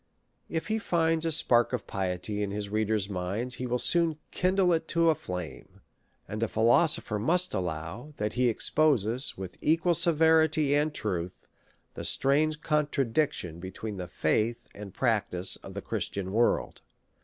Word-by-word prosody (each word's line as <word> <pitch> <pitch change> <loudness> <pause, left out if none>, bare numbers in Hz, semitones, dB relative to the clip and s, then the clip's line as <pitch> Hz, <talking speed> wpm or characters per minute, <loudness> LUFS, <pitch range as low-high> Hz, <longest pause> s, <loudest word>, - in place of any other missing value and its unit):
If 160 +5 -3
he 220 +1 0
finds 165 -4 +1
a - - 0
spark 120 -6 +3
of 125 - -2
piety 95 +2 -3
in 100 - -1
his 100 0 -4
reader's 110 -1 0
mind, 100 +6 -3
he 125 +1 -4
will 125 0 0
soon 165 +3 +3
kindle 185 -1 +2
it 160 0 -1
to 165 0 +3
a - - +3
flame; 90 - -8 0.5
and 110 +1 -5
a 115 - +1
philosopher 115 0 +2
must 175 - +2
allow, 90 - -5
that 105 0 -2
he 125 0 +2
exposes, 125 -1 +1
with 95 -1 -8
equal 165 +3 +2
severity 160 -3 +3
and 150 +2 +2
truth, 90 -9 -3 0.5
the - - -7
strange 150 +3 +2
contradic 150 -3 +1
tion 85 -2 -7
between 95 +3 -6
the 90 -1 -5
faith 110 +7 -1
and 100 -2 -10
practice 105 -6 0
of - - -12
the - - -5
Christian 95 -1 -3
world. 115 +3 +1
120 Hz, 155 wpm, -28 LUFS, 100-155 Hz, 0.5 s, spark